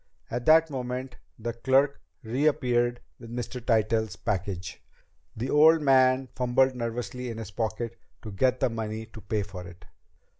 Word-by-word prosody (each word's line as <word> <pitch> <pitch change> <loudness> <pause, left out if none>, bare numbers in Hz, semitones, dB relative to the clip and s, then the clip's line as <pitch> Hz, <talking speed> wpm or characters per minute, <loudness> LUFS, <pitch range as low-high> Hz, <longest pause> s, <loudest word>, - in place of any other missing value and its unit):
At 120 +1 -3
that 160 0 +6
moment 125 -1 -4 0.2
the 115 +1 -4
clerk 135 +4 +2 0.2
reappeared 120 -1 +1 0.2
with 115 - -11
Mr. 120 +1 -5
Tytell's 110 -1 +1
package. 95 -2 -3 0.6
The 125 +4 -2
old 155 +1 +6
man 130 -1 +4
fumbled 130 +1 +2
nervously 120 +1 -4
in 115 - -6
his 110 -3 -7
pocket 115 +1 -3 0.2
to 110 - -7
get 125 +6 +1
the - - +3
money 110 -1 -4
to 110 0 -13
pay 105 -1 -1
for 95 -2 -8
it. 90 0 -14
120 Hz, 150 wpm, -27 LUFS, 110-130 Hz, 0.6 s, that